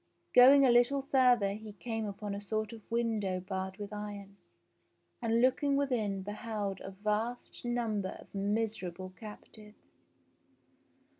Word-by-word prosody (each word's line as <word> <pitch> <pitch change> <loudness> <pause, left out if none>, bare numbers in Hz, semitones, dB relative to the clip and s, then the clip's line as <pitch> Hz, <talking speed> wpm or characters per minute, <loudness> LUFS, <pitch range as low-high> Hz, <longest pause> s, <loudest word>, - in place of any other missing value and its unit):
Going 270 +3 +8
a 250 - +5
little 245 +3 +4
further 250 -7 +3
he 215 0 -9
came 225 +1 -4
upon 205 0 -5
a 200 - -5
sort 215 +1 -3
of 225 - -10
window 220 -5 0
barred 190 0 -4
with 205 0 -7
iron, 205 -1 -7 0.8
and 230 0 +2
looking 275 +3 +3
within 220 -9 0
beheld 205 -1 -4
a - - -6
vast 210 +5 -3
number 230 -5 -1
of - - -16
miserable 195 -3 -2
captives. 210 +1 -12
215 Hz, 130 wpm, -32 LUFS, 200-240 Hz, 0.8 s, Going